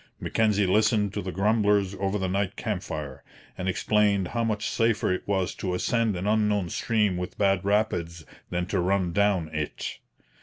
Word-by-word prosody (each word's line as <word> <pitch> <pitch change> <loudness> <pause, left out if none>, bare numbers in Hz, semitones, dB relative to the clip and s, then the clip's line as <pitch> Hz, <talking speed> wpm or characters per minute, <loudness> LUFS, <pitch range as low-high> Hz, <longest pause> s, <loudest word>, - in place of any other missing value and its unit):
Mackenzie 105 -3 +1
listened 105 +1 +2
to - - -2
the 95 - -4
grumblers 100 0 +2
over 100 +1 0
the 95 -2 -1
night 100 +1 -1
camp - - -3
fire, 70 -3 -6 0.3
and 90 +1 -3
explained 100 -1 +2
how 115 0 -1
much 110 -2 -1
safer 115 -4 +1
it 90 - -2
was 95 -2 0
to 90 -2 -3
ascend 115 +2 +1
an 90 +2 -4
unknown 105 -3 +1
stream 105 -3 +1
with 90 0 -5
bad 95 -2 +2
rapids 90 -6 0 0.2
than 90 0 -1
to 95 +1 -1
run 90 -1 +1
down 100 -4 +2
it. 75 -1 -4
100 Hz, 175 wpm, -26 LUFS, 90-105 Hz, 0.3 s, listened